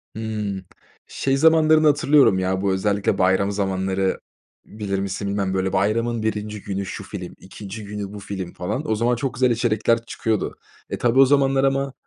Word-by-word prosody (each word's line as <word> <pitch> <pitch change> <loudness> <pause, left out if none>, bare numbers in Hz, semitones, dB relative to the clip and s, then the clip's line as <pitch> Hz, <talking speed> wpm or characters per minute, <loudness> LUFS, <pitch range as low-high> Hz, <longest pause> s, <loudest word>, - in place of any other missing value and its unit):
Hımm, 105 -4 -4 0.4
şey 135 0 -1
zamanlarını 155 0 +5
hatırlıyorum, 145 -8 +4
ya, 95 0 -1
bu 100 -1 +1
özellikle 100 +1 0
bayram 95 +2 +2
zamanları 95 -1 -1 0.5
bilir 100 -2 -4
misin 100 +1 -3
bilmem, 100 -1 -1
böyle, 95 0 -1
bayramın 110 +4 0
1'inci 105 -1 -3
günü 100 0 -3
şu 95 +1 -6
film, 90 -2 -7
2'nci 100 +2 -9
günü 100 -1 -6
bu 105 - -7
film 95 -3 -6
falan 110 +10 -3
o - - +2
zaman 120 +3 +1
çok 130 0 -3
güzel 125 0 +2
içerikler 115 0 +1
çıkıyordu. 110 -3 -2 0.3
E, - - -3
tabii 120 +2 +2
o 135 - +9
zamanlar 135 -1 +3
ama 135 0 0
105 Hz, 170 wpm, -22 LUFS, 95-120 Hz, 0.5 s, o